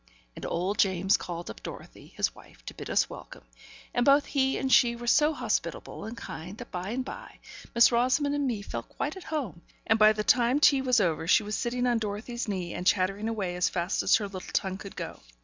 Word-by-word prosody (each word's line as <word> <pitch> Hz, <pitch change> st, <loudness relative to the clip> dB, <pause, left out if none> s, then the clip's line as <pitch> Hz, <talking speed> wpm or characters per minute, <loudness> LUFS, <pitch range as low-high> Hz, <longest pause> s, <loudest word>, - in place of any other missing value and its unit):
And -, -, -6 dB
old 185 Hz, +4 st, -2 dB
James 190 Hz, 0 st, +3 dB
called 170 Hz, -1 st, -5 dB
up -, -, -13 dB
Dorothy, -, -, -10 dB
his -, -, +1 dB
wife, -, -, -18 dB
to -, -, -7 dB
bid -, -, -8 dB
us -, -, +2 dB
welcome; -, -, -11 dB, 0.5 s
and 245 Hz, -, +2 dB
both 280 Hz, +2 st, +5 dB
he 265 Hz, -2 st, +1 dB
and 265 Hz, -1 st, 0 dB
she 235 Hz, -1 st, +5 dB
were 240 Hz, 0 st, -8 dB
so 300 Hz, +5 st, +4 dB
hospitable -, -, -3 dB
and 225 Hz, +2 st, -7 dB
kind, 180 Hz, +2 st, -8 dB
that 245 Hz, -, -10 dB
by 180 Hz, +1 st, -4 dB
and 255 Hz, +3 st, -2 dB
by -, -, -9 dB, 0.4 s
Miss 235 Hz, +1 st, +7 dB
Rosamond 255 Hz, +5 st, +2 dB
and 290 Hz, -1 st, 0 dB
me 220 Hz, -5 st, -2 dB
felt 115 Hz, -10 st, -6 dB
quite 295 Hz, -, -4 dB
at 380 Hz, -, -10 dB
home; 260 Hz, -, -4 dB, 0.2 s
and 220 Hz, -, +2 dB
by 215 Hz, 0 st, +8 dB
the 210 Hz, 0 st, -2 dB
time 245 Hz, +4 st, +3 dB
tea 280 Hz, -2 st, +5 dB
was 255 Hz, -3 st, +3 dB
over, 165 Hz, -4 st, 0 dB
she 210 Hz, -, +5 dB
was 210 Hz, +1 st, -3 dB
sitting 245 Hz, +1 st, -1 dB
on 240 Hz, -2 st, +2 dB
Dorothy's 220 Hz, +3 st, -4 dB
knee, 185 Hz, -4 st, -3 dB
and 180 Hz, -, -4 dB
chattering 195 Hz, +3 st, +1 dB
away 195 Hz, -6 st, -2 dB
as 180 Hz, -, +1 dB
fast 175 Hz, 0 st, -1 dB
as -, -, +4 dB
her 215 Hz, -, 0 dB
little 190 Hz, -2 st, -8 dB
tongue 190 Hz, 0 st, -1 dB
could 200 Hz, -, -9 dB
go. -, -, -6 dB
220 Hz, 225 wpm, -28 LUFS, 190-250 Hz, 0.5 s, by